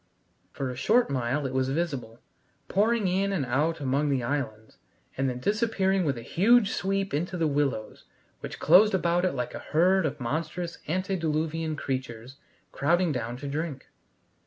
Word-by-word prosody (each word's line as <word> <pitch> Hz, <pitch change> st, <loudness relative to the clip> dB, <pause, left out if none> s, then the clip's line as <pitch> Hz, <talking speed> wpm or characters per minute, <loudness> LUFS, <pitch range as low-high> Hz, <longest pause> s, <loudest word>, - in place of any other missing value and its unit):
For 135 Hz, -2 st, -3 dB
a -, -, -7 dB
short 225 Hz, -, +2 dB
mile 130 Hz, +2 st, -1 dB
it 130 Hz, -, -3 dB
was 130 Hz, 0 st, +1 dB
visible, 135 Hz, -7 st, -3 dB, 0.5 s
pouring 215 Hz, +1 st, +2 dB
in 195 Hz, +2 st, +1 dB
and 170 Hz, -9 st, -1 dB
out 150 Hz, +7 st, 0 dB
among 140 Hz, +2 st, 0 dB
the 135 Hz, -3 st, 0 dB
islands, 115 Hz, -5 st, -4 dB, 0.4 s
and 135 Hz, 0 st, 0 dB
then 125 Hz, -, -4 dB
disappearing 195 Hz, -, +1 dB
with 140 Hz, -4 st, 0 dB
a 115 Hz, -, -7 dB
huge 215 Hz, -, +4 dB
sweep 195 Hz, -1 st, -1 dB
into 175 Hz, +5 st, -2 dB
the 165 Hz, -, +1 dB
willows, 140 Hz, -7 st, -1 dB, 0.3 s
which -, -, -7 dB
closed 190 Hz, +6 st, +6 dB
about 175 Hz, 0 st, +1 dB
it 185 Hz, -, +1 dB
like 125 Hz, -, -3 dB
a -, -, -5 dB
herd 180 Hz, +2 st, +2 dB
of 140 Hz, -, -6 dB
monstrous 160 Hz, +7 st, -3 dB
antediluvian 165 Hz, -3 st, -1 dB
creatures 130 Hz, -2 st, -5 dB, 0.3 s
crowding 170 Hz, +4 st, +2 dB
down 120 Hz, -2 st, -3 dB
to 140 Hz, +3 st, -7 dB
drink. 145 Hz, -1 st, -4 dB
155 Hz, 160 wpm, -27 LUFS, 130-185 Hz, 0.5 s, closed